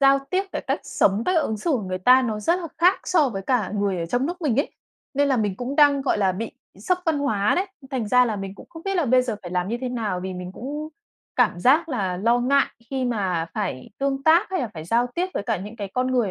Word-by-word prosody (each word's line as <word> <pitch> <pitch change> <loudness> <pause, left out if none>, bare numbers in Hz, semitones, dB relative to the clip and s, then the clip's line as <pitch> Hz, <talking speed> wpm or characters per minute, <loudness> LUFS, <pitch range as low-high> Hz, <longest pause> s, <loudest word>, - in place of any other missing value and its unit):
giao 275 0 +6
tiếp, 375 +1 +2
cái - - -3
cách - - 0
sống, 200 +3 +1
cách 365 - +2
ứng 220 - -2
xử 270 +11 -2
của 255 -7 +1
người 185 -1 -3
ta 250 +7 +6
nó 220 -4 -2
rất 340 - +2
là 340 - -4
khác 360 +3 +4
so 315 -6 +3
với 195 -5 -5
cả 225 -3 0
người 200 -3 0
ở 165 - -2
trong 245 +9 0
nước 350 +2 -5
mình 270 -7 +1
ấy. - - -4 0.4
Nên 285 +1 +2
là 265 - +2
mình 205 -4 0
cũng 255 +5 -4
đang, 285 -2 +5
gọi 265 - +1
là, 190 -2 +2
bị 220 +5 -4 0.3
sốc 360 - 0
văn 320 -3 +2
hóa 215 -8 +1
đấy. 375 +2 +1 0.2
Thành 250 -6 -2
ra 250 +3 +5
là 220 -3 -2
mình 195 -1 -6
cũng - - -13
không 325 -1 -11
biết 390 +1 -2
là 340 - +2
bây 255 0 +4
giờ 240 -4 -3
phải 175 - -7
làm 180 +1 -1
như 235 +3 -2
thế 255 - -2
nào 220 -7 -2
vì 185 0 -5
mình 180 0 -7
cũng 295 +8 -5 0.5
cảm 220 -8 +2
giác 300 - +4
là 195 - -1
lo 230 +6 +2
ngại 275 +3 +3 0.2
khi 265 -1 -1
mà 190 -9 -1
phải 195 -12 -3
tương 275 0 -1
tác 330 +7 +4
hay 375 -2 0
là 245 - -2
phải 155 -1 -7
giao 235 +8 +2
tiếp 360 +2 0
với - - -1
cả - - -1
những 205 +5 -8
cái 200 -3 -5
con 255 0 +1
người 245 -6 +1
245 Hz, 275 wpm, -23 LUFS, 200-280 Hz, 0.5 s, giao